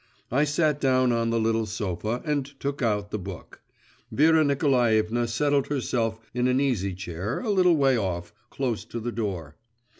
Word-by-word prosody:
I 140 Hz, +5 st, +3 dB
sat 150 Hz, 0 st, +1 dB
down 130 Hz, -2 st, +3 dB
on 115 Hz, -1 st, +1 dB
the 115 Hz, 0 st, +1 dB
little 115 Hz, 0 st, +1 dB
sofa, 105 Hz, +2 st, -3 dB
and 150 Hz, -2 st, 0 dB, 0.2 s
took 140 Hz, 0 st, -3 dB
out 105 Hz, -3 st, 0 dB
the 105 Hz, -, -2 dB
book. 95 Hz, -2 st, -9 dB, 0.5 s
Vera 160 Hz, +2 st, +4 dB
Nikolaevna 120 Hz, -5 st, +2 dB
settled 140 Hz, +4 st, +1 dB
herself 120 Hz, -5 st, -1 dB
in 125 Hz, +1 st, +1 dB
an 130 Hz, +1 st, +2 dB
easy 105 Hz, -9 st, 0 dB
chair, 90 Hz, +5 st, -4 dB
a 230 Hz, -4 st, -1 dB
little 180 Hz, -3 st, +4 dB
way 135 Hz, -3 st, +3 dB
off, 90 Hz, -4 st, -3 dB, 0.2 s
close 125 Hz, -5 st, -2 dB
to 115 Hz, -, -6 dB
the 120 Hz, +2 st, -3 dB
door. 95 Hz, -10 st, -4 dB
120 Hz, 170 wpm, -26 LUFS, 105-140 Hz, 0.5 s, Vera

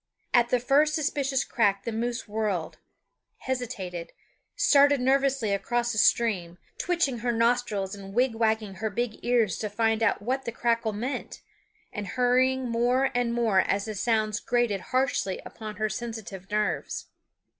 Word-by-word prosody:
At 240 Hz, -1 st, +4 dB
the 250 Hz, -, +2 dB
first 290 Hz, +5 st, +3 dB
suspicious 280 Hz, -3 st, 0 dB
crack 200 Hz, -4 st, +1 dB
the 230 Hz, -, -3 dB
moose 235 Hz, +2 st, -3 dB
whirled, 205 Hz, -6 st, -2 dB, 0.6 s
hesitated, 205 Hz, -10 st, -4 dB, 0.4 s
started 285 Hz, -1 st, +5 dB
nervously 265 Hz, -3 st, +2 dB
across 240 Hz, +4 st, 0 dB
the 215 Hz, -, -1 dB
stream, 190 Hz, -7 st, +2 dB, 0.2 s
twitching 335 Hz, -9 st, 0 dB
her 240 Hz, +1 st, 0 dB
nostrils 230 Hz, -4 st, +1 dB
and 195 Hz, -1 st, -9 dB
wigwagging 220 Hz, -4 st, 0 dB
her 220 Hz, -, -2 dB
big 230 Hz, +2 st, -3 dB
ears 235 Hz, -5 st, +2 dB
to 215 Hz, -, -2 dB
find 225 Hz, +1 st, +1 dB
out 225 Hz, -, +2 dB
what 260 Hz, +6 st, -2 dB
the 235 Hz, -, -2 dB
crackle 230 Hz, -1 st, 0 dB
meant, 240 Hz, +7 st, -5 dB, 0.5 s
and 205 Hz, -1 st, -4 dB
hurrying 255 Hz, +1 st, +2 dB
more 245 Hz, +3 st, +2 dB
and 245 Hz, -1 st, 0 dB
more 225 Hz, -5 st, +3 dB
as 200 Hz, +2 st, +1 dB
the 215 Hz, -, -4 dB
sounds 215 Hz, 0 st, 0 dB
grated 240 Hz, -5 st, 0 dB
harshly 255 Hz, -7 st, 0 dB
upon 215 Hz, -1 st, -8 dB
her 215 Hz, +1 st, 0 dB
sensitive 215 Hz, -4 st, -6 dB
nerves. 210 Hz, 0 st, -1 dB
230 Hz, 145 wpm, -27 LUFS, 210-250 Hz, 0.6 s, started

